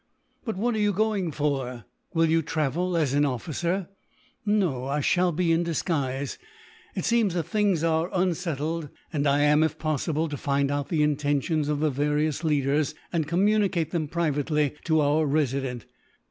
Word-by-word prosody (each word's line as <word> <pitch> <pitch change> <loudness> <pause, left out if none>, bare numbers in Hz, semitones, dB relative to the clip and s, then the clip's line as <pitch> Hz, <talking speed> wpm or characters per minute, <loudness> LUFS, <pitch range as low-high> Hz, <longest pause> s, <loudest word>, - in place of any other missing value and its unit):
"But 225 - -2
what 240 +4 0
are 220 - -1
you 205 -1 +2
going 205 -4 0
for? 135 -6 -2 0.3
Will 165 0 +4
you 165 0 +3
travel 160 +4 -1
as 150 -5 +1
an 145 +1 +3
officer?" 170 - -1 0.6
"No, 185 -12 +1
I 140 +2 -1
shall 175 +5 +2
be 170 +1 +1
in 165 +1 +3
disguise. 145 -5 -2 0.6
It - - -2
seems 230 -6 +2
that 170 - 0
things 190 -1 +1
are 165 +1 +1
unsettled; 165 -4 -1 0.2
and 145 -1 +1
I 140 +1 +3
am, 150 +1 +4
if 160 -1 +1
possible, 155 +1 -1
to 145 - -4
find 140 +1 0
out 145 -1 -2
the 155 -3 +2
intentions 150 +1 0
of 150 -1 -1
the 155 -1 +2
various 150 +3 0
leaders, 150 0 +1 0.2
and 160 -3 0
communicate 190 -2 +2
them 160 -4 -1
privately 150 -2 0
to 160 -2 +3
our 150 +2 +2
Resident. 135 -4 -1
155 Hz, 165 wpm, -26 LUFS, 145-170 Hz, 0.6 s, Will